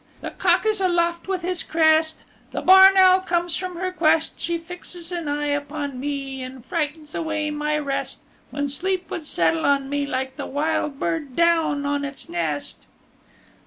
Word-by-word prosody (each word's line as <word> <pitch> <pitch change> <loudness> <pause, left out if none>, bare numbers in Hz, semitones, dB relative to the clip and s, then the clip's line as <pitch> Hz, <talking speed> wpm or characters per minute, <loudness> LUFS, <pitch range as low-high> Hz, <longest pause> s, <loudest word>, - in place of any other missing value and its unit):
The - - -5
cock - - +2
is 430 -2 +1
aloft 340 -2 +1
with 375 -2 -2
his 360 -1 -1
crest: 315 0 +2 0.3
The - - -4
barn 380 +1 +8
owl 375 0 +7
comes 345 -2 -1
from 365 -1 -4
her 370 +2 -2
quest 320 -2 +1
She 340 0 -1
fixes 350 0 -7
an 340 -3 -4
eye 295 0 -1
upon 285 -2 -3
me 275 -1 -4
And 255 -1 -9
frightens 305 -1 -3
away 310 -2 -2
my 300 0 -1
rest 280 -2 -3 0.3
When 285 0 -2
sleep 360 +4 -2
would 315 -3 -5
settle 165 - +1
on 275 -1 +1
me 285 0 -1
Like 265 -1 -3
the - - -5
wild 290 -1 -1
bird 295 -6 -2
down 325 -4 +2
on 285 0 -1
its 280 -1 -7
nest. 160 -4 -4
310 Hz, 170 wpm, -23 LUFS, 285-345 Hz, 0.3 s, barn